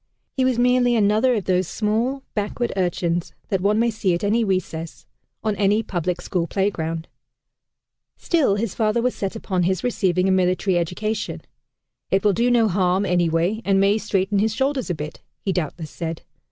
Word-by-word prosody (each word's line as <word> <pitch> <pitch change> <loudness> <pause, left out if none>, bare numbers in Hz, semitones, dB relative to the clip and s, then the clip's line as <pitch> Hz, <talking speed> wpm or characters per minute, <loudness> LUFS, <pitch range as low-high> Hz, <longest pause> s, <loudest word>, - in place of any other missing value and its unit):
He 265 - +1
was 255 -2 +2
merely 245 0 +3
another 220 +4 +3
of 210 - -1
those 185 -1 +1
small, 235 +7 -1
backward 210 +3 -2
urchins 175 -2 -1 0.2
that 190 -2 0
one 205 +2 +2
may 235 +1 +2
see 200 -5 0
at 170 - -5
any 220 +3 +2
recess, 170 -5 -3 0.4
on 215 -2 0
any 210 +2 +2
public 175 -2 -2
school 175 -2 -2
playground. 165 -5 -2 1.1
Still 310 - +2
his 205 -1 -2
father 215 0 +1
was 250 +1 +1
set 195 +2 -4
upon 190 -4 -2
his 185 0 0
receiving 190 -7 +1
a - - +3
military 185 +1 +2
education. 195 +6 -2 0.7
"It 195 0 +2
will 205 -1 +4
do 235 +5 +2
no 235 -2 +4
harm, 185 0 +1
anyway, 175 +3 +1
and 195 -1 +2
may 200 +2 +3
straighten 195 0 0
his 220 +1 +1
shoulders 270 -3 0
a 175 - 0
bit," 150 +1 -7 0.2
he 195 - -2
doubtless 160 -2 -3
said. 165 -1 -5
195 Hz, 175 wpm, -22 LUFS, 180-220 Hz, 1.1 s, will